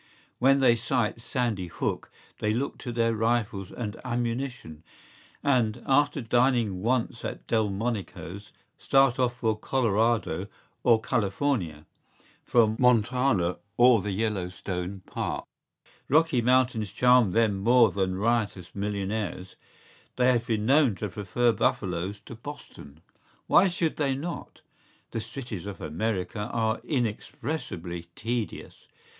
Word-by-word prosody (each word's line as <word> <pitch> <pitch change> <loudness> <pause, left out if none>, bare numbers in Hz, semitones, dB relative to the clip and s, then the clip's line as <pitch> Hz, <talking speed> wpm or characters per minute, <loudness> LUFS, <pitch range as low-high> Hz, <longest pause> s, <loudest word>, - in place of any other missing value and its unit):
¬Ý - - -31 0.4
When 135 +2 +5
they 120 -3 +6
sight 115 -1 -1
Sandy 115 - -2
Hook - - -3 0.3
they 105 0 0
look 135 +4 -3
to 125 - -5
their 115 -1 +1
rifles 110 -4 -1
and 115 -2 -6
ammunition; 120 - -3 0.6
and, 120 -6 +1
after 145 +1 +2
dining 120 -5 +2
once 120 +1 0
at - - -5
Delmonico’s, 100 -4 -2 0.3
start 135 -1 +3
off 125 -1 +1
for 115 -3 0
Colorado 110 -5 0 0.3
or 115 -2 +5
California, 100 - -1 0.6
for 110 -2 +3
Montana 125 -6 +3 0.2
or 120 -3 +6
the 105 - -4
Yellow 100 -2 -1
Stone 90 +1 -5
Park.¬Ý - - -7 0.2
Rocky 155 -3 +4
Mountains 125 -4 +2
charm 125 0 +5
them 105 0 +2
more 115 +1 +5
than 95 -1 -1
riotous 105 -3 -1
millionaires; 100 -2 -3 0.6
they 125 0 +4
have 120 -2 0
been 110 -2 0
known 135 -3 +4
to 105 +3 -4
prefer 105 +6 +1
buffaloes 95 -2 -1
to - - -9
Boston.¬Ý 85 - -11 0.4
Why 190 - +5
should 170 -3 -1
they 140 -3 +1
not?¬Ý 165 +6 -6 0.5
The 115 - -3
cities 110 -4 -7
of 100 - -7
America 95 +4 -2
are 110 -1 0
inexpressibly 105 - -3
tedious. 115 0 -4
115 Hz, 125 wpm, -27 LUFS, 100-125 Hz, 0.6 s, they